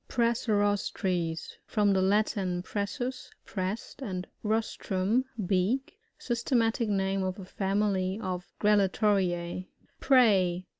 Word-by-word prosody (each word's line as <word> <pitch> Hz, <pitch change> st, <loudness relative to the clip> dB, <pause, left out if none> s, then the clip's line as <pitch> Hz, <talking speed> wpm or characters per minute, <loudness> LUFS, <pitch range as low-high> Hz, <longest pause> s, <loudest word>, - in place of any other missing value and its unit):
Prrssirostres. 205 Hz, -7 st, 0 dB
— -, -, -40 dB
From 205 Hz, -2 st, +4 dB
the 190 Hz, -, +2 dB
Latin, 190 Hz, -2 st, +1 dB
pre$8U8f 220 Hz, +7 st, -3 dB, 0.2 s
pressed, 195 Hz, +7 st, -4 dB
and 185 Hz, -7 st, -4 dB, 0.2 s
rostrum, 220 Hz, +1 st, 0 dB, 0.2 s
beak. 225 Hz, -, 0 dB, 0.2 s
Systematic 235 Hz, -1 st, 0 dB
name 195 Hz, -1 st, 0 dB
of 185 Hz, 0 st, -2 dB
a 195 Hz, -, -8 dB
family 195 Hz, 0 st, 0 dB
of 185 Hz, -4 st, -4 dB
Grallatoriffi. 190 Hz, -4 st, +2 dB, 0.3 s
Prey. 195 Hz, -9 st, +4 dB
200 Hz, 100 wpm, -29 LUFS, 185-225 Hz, 0.3 s, From